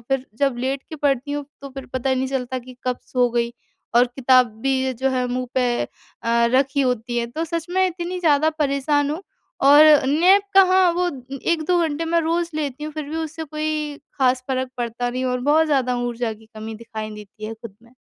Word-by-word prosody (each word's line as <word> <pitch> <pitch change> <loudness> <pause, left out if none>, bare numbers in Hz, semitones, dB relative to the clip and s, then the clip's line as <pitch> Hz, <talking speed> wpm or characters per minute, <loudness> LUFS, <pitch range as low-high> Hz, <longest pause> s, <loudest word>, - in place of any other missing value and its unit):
फिर 270 -1 0
जब 275 -3 +1
लेट 265 +2 -2
के 315 - -7
पढ़ती 280 -1 0
हूँ, 290 0 -3 0.2
तो 280 - -8
फिर 270 0 -8
पता 260 +1 -1
नहीं 260 0 -1
चलता 260 -1 -2
कि 255 0 -12
कब 250 -1 0
सो 250 -1 +2
गई 235 0 0 0.4
और 245 - +7
किताब 255 0 +4 0.2
भी 270 0 +2
ये 260 - 0
जो 260 +3 0
है 255 -1 0
मुँह 250 +1 -2
पे 245 -2 +1
अ, - - -12 0.7
रखी 275 +1 +2
होती 245 -2 -1
है। 235 - -1
तो 310 +8 -4
सच 335 +1 -3
में 375 +1 +3
इतनी 360 +1 -4
ज़्यादा 310 -2 +3
परेशान 290 0 +1
हूँ 315 - -3 0.5
और 295 +2 +9 0.2
नैप 360 +8 +5
कहाँ 375 -2 +6
वो 360 - +2 0.4
1-2 340 +2 +1
घंटे 320 0 -1
मैं 335 +1 +2
रोज़ 335 +1 -1
लेती 295 -1 -3
हूँ 305 - -5
फिर 305 -1 -5
भी 315 - -4
उससे 320 0 -4
कोई 305 -1 -3 0.2
खास 255 -1 +2
फ़र्क 260 -1 -1
पड़ता 240 0 -2
नहीं 255 +1 -3
और 250 0 -1
बहुत 315 +1 +4
ज़्यादा 255 -4 +1
ऊर्जा 240 -1 -2
की 220 0 -15
कमी 220 +1 -7
दिखाई 220 -1 -7
देती 210 0 -11
है 225 - -5
खुद 225 -3 -11
में। 235 +1 -21
270 Hz, 210 wpm, -22 LUFS, 245-310 Hz, 0.7 s, और